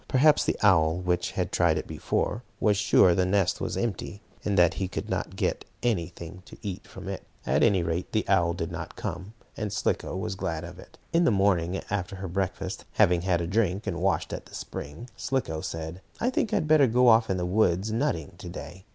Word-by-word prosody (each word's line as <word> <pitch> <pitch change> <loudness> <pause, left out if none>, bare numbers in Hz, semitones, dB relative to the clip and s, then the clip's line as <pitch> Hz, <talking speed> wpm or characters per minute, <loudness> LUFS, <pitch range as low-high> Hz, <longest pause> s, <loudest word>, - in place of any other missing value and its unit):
Perhaps 150 +3 +4
the - - 0
owl, 80 -5 +5
which 90 -1 -1
had - - -1
tried - - +3
it - - -3
before, 110 - -2 0.2
was 105 -2 +3
sure 100 -3 +5
the 90 - +2
nest 95 -1 +1
was - - -2
empty, 105 -3 -3 0.2
and 100 -2 0
that 90 -1 +5
he 95 - -2
could 90 - -5
not - - -2
get - - -1 0.2
anything 90 -4 -2
to - - -13
eat 100 -1 -5
from 95 0 -10
it. 95 -1 -4 0.2
At 70 +4 +2
any 95 -6 +4
rate 85 +2 -2
the 110 - 0
owl 85 -3 +3
did 80 -2 -3
not - - -6
come, 95 +5 -5 0.2
and 105 -1 -3
Slicko 95 - -1
was 95 +1 -3
glad 80 -4 -3
of 90 +1 -9
it. - - -15 0.2
In 170 +1 +4
the - - +5
morning, 95 -3 +2
after 100 -2 -2
her 95 0 -5
breakfast, 95 +1 -3
having 90 -5 +4
had 90 -1 +1
a - - -1
drink 100 +1 0
and 85 -4 -3
washed 95 -2 0
at - - -6
the - - -11
spring, 75 +12 -7
Slicko 125 -13 -2
said: 80 +3 -5 0.2
"I 245 - +1
think 230 - 0
I - - +1
had 155 - 0
better 150 -3 +6
go 125 +2 +4
off 115 -1 +6
in 95 - +1
the 90 - -1
woods 95 +1 +2
nutting, 110 - -1
to 90 - -7
day. 85 +2 -9
95 Hz, 220 wpm, -27 LUFS, 85-105 Hz, 0.2 s, better